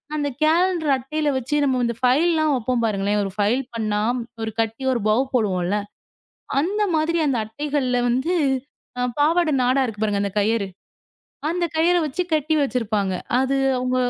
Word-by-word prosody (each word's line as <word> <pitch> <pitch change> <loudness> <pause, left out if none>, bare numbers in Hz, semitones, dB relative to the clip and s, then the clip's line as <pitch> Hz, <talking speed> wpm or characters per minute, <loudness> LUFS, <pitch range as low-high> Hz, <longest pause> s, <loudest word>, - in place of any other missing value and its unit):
அந்த 295 -1 -1 0.2
கேலண்டர் 330 -1 +2
அட்டையில் 295 +4 -2
வைச்சு 260 +4 -2
நாம் 255 -3 +1
இந்த 235 -1 -2
ஃபைல் 265 +7 +3
எல்லாம் 310 -1 +2
வைப்போம் 245 0 -1
பாருங்களேன். 205 -1 0
ஒரு 195 - -4
ஃபைல் 215 +6 +2
பண்ணினா 215 -2 -1 0.4
ஒரு 220 - -3
கட்டி 225 +4 -3
ஒரு 235 - -1
பவ் 235 +5 +3
போடுவோம் 195 -7 +1
இல்லை. 205 +3 0 0.8
அந்த 400 +8 0
மாதிரி 330 +2 +1
அந்த 265 -4 +1
அட்டைகளில் 250 0 -1
வந்து 265 +9 0 0.9
பாவாடை 320 +1 +3
நாடா 255 +2 +2
இருக்கு 220 -3 -6
பாருங்க 205 -2 0
அந்தக் 200 +1 -4
கயிறு. 210 -1 +1 0.8
அந்தக் 345 -2 -2
கயிறு 345 +2 +3
வைச்சு 305 +5 -2
கட்டி 310 +1 +1
வைச்சிருப்பாங்க. 215 -8 0 0.3
அது 265 +1 +1 0.2
அவங்க, 255 0 -1
255 Hz, 160 wpm, -22 LUFS, 220-310 Hz, 0.9 s, ஃபைல்